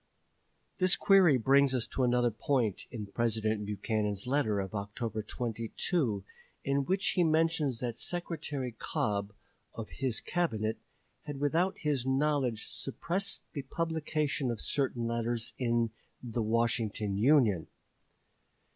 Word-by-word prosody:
This 185 -2 +4
query 185 -8 +6
brings 135 +2 +4
us 120 - +2
to - - -2
another 125 -1 +3
point 115 -2 0
in 110 -3 -5
President 110 0 0
Buchanan's 105 0 -1
letter 125 -6 +1
of 95 0 -4
October 105 +2 -3
22, 115 - -1 0.4
in 140 0 +1
which 190 +4 +2
he 180 - +2
mentions 160 -5 +2
that 120 -2 -2
Secretary 150 -5 -3
Cobb, 105 -2 -2 0.4
of 115 -2 -6
his 130 -4 -2
Cabinet, 110 -11 -1 0.5
had 145 -2 -5
without 165 +7 +1
his 140 -5 0
knowledge 135 -4 +1
suppressed 180 +8 -3
the 145 - -3
publication 155 -1 -1
of 115 -3 -2
certain 130 -4 0
letters 115 0 -1
in 120 -2 +1 0.3
the 120 -1 -2
"Washington 110 -2 0
Union." 115 - +4
125 Hz, 120 wpm, -31 LUFS, 110-145 Hz, 0.5 s, query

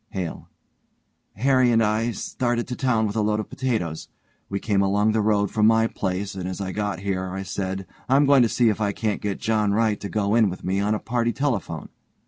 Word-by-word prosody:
HALE: 90 -4 -5 0.9
Harry 130 +2 +3
and 115 -1 +4
I 110 +1 +1
had 120 -2 -2
started 120 -1 -2
to 125 - -3
town 120 -5 +1
with 105 0 -3
a 110 - +1
load 105 0 +1
of 110 - -6
potatoes. 110 -12 -2 0.4
We 100 - -2
came 100 -2 +1
along 100 +2 +2
the 110 0 +1
road 105 -1 +1
from 110 -1 +3
my 115 0 +4
place 95 -2 -3
and 95 -1 -4
as 95 - -5
I 95 -1 -3
got 100 -3 -3
here 95 -2 -2
I 95 +1 -4
said, 95 0 -4 0.2
I'm 140 +2 +5
going 140 -1 +6
to 115 - +3
see 120 0 +3
if 110 0 -1
I 100 -1 +1
can't 105 -1 -2
get 100 -2 -3
John 110 -3 +1
Wright 110 -1 +1
to 100 - -6
go 105 -1 0
in 110 -3 +4
with 90 - -7
me 95 +1 0
on 105 +2 +1
a - - -3
party 120 0 0
telephone.' 135 - -2
105 Hz, 230 wpm, -24 LUFS, 100-115 Hz, 0.9 s, going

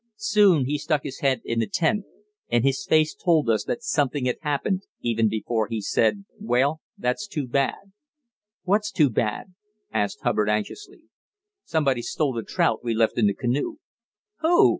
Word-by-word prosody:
Soon 205 - +4
he 145 +3 -1
stuck 150 -1 0
his 135 - -6
head 135 -2 +1
in 115 0 -1
the 115 - 0
tent, 195 +5 0 0.4
and 120 -1 +2
his 135 0 0
face 155 -1 +3
told 160 -6 +2
us 110 - 0
something 145 - 0
had 125 - -1
happened 165 +6 -1
even 115 -2 +1
before 110 0 -1
he 115 -1 -3
said: 115 - +1
"Well, 145 - +1 0.2
that's 125 +12 -2
too 155 -9 -3
bad." 140 +10 -1 0.7
"What's 205 +3 +1
too 150 -7 +3
bad?" 110 - -2 0.4
asked 105 -2 -1
Hubbard 105 -1 +1
anxiously. 370 - -3 0.6
"Somebody's 135 -7 0
stole 145 -4 0
the 115 - -3
trout 110 0 0
we 115 -2 -1
left 115 +1 +2
in 105 - +4
the 100 - +1
canoe." 125 +4 -1 0.6
"Who?" 340 +2 +5
140 Hz, 160 wpm, -24 LUFS, 115-175 Hz, 0.7 s, Who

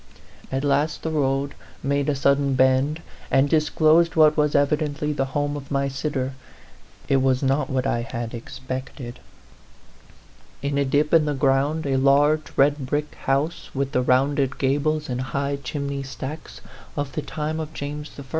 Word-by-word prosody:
At 135 +1 -1
last 145 +2 +1
the 160 - -2
road 140 -2 0 0.3
made 140 +1 0
a 145 - +1
sud 140 +1 +3
den 140 -1 0
bend, 130 +5 +2 0.3
and 135 +1 +4
disclosed 160 +2 +3
what 155 -1 +6
was 150 -1 +1
evidently 150 +1 +1
the 135 -2 0
home 145 0 0
of 140 -1 -8
my 140 -1 0
sitter. 135 -1 -2 0.7
It 135 - +3
was 130 0 +2
not 135 +1 +1
what 130 -1 0
I 120 -3 0
had 115 0 -5
expected. 130 +1 -7 1.4
In 140 0 0
a 140 - +2
dip 145 +3 +1
in 160 -2 +6
the 150 -1 -1
ground 140 +4 +1
a 135 -1 +1
large 145 +3 +3
red 140 -1 +3
brick 150 +2 -2
house, 140 +5 -1
with 135 0 -1
the 125 - +2
rounded 135 +2 +2
gables 145 +3 0
and 125 0 -2
high 140 +2 -2
chimney 140 +1 -3
stacks 135 +4 -7 0.4
of 145 -1 -2
the 155 - -3
time 155 +1 -3
of 155 -1 -5
James 150 0 -5
I. - - -6
140 Hz, 165 wpm, -23 LUFS, 135-150 Hz, 1.4 s, what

